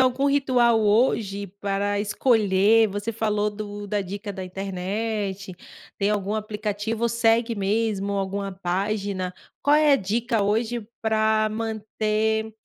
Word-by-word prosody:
algum 260 +2 +3
ritual 250 -5 +3
hoje 205 -2 +1
para 200 0 0
escolher, 210 0 +3
você 205 +3 -3
falou 210 -1 0
do 205 0 -7
da 205 +1 -1
dica 200 +2 -5
da 190 -1 -6
internet, 195 +1 -3 0.5
tem 200 0 +1
algum 205 0 -1
aplicativo, 215 +1 -3
ou 235 - +3
segue 230 0 +2
mesmo 200 0 0
alguma 195 0 -2
página? 190 0 -2 0.3
Qual 290 +1 +4
é 300 -1 +5
a - - +6
dica, 230 +2 -1
hoje, 220 +2 0 0.2
pra 220 0 +2
manter, 220 0 -1
210 Hz, 130 wpm, -24 LUFS, 200-225 Hz, 0.5 s, a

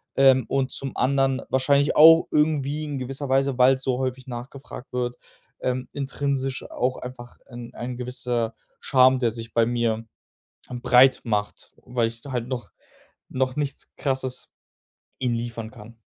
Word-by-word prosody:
ähm, 130 -2 +5
und 135 -1 0
zum 135 -2 -3
anderen 135 0 +1
wahrscheinlich 140 +2 +2
auch 165 +2 +8
irgendwie 150 -1 +1
in 145 -3 -4
gewisser 135 +2 -5
Weise, 135 0 +2
weil's 130 +1 +4
so 130 -2 0
häufig 130 0 -3
nachgefragt 130 +2 -9
wird, 125 -1 -2 0.4
ähm, 125 0 -2
intrinsisch 135 -1 -2
auch 125 +1 -1
einfach 125 -1 -10
'n 120 -1 -10
ein 125 +1 -6
gewisser 125 -2 -1 0.3
Scham, 130 -1 +4
der 120 -3 +1
sich 115 0 -7
bei 115 - +4
mir 115 -1 -1 0.6
breit 125 +1 +4
macht, 105 -3 -3
weil 120 -2 0
ich 115 0 -8
da 140 - -8
halt 120 -2 -2
noch 125 -2 -5 0.6
noch 130 0 -1
nichts 145 -2 -4
Krasses 130 -2 -2 0.7
ihnen 125 -2 0
liefern 115 -1 -5
kann. 110 +2 -13
130 Hz, 150 wpm, -24 LUFS, 120-135 Hz, 0.7 s, auch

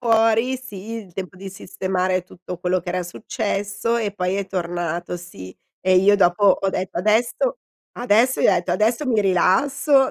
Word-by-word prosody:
fuori, 225 +2 +3
sì 220 -4 -9
il 210 -6 -7
tempo 180 -2 -7
di 195 +1 -8
sistemare 185 -1 -2
tutto 180 0 -9
quello 180 +1 0
che 180 - -10
era 180 +1 -1
successo 205 +4 -2
e 210 -3 -2
poi 185 -1 -1
è 200 -1 -2
tornato, 175 -1 -3
sì, 95 - -11 0.3
e 185 0 +3
io 200 +2 +5
dopo 195 +1 +3
ho 195 0 +4
detto: 185 -2 -4
"Adesso 235 - +1 0.4
adesso" 245 +2 +3
Gli - - +4
ho - - +6
detto: 175 +1 -1
"Adesso 225 +9 +1
mi 225 -4 +2
rilasso 265 - +3
195 Hz, 170 wpm, -21 LUFS, 180-225 Hz, 0.4 s, ho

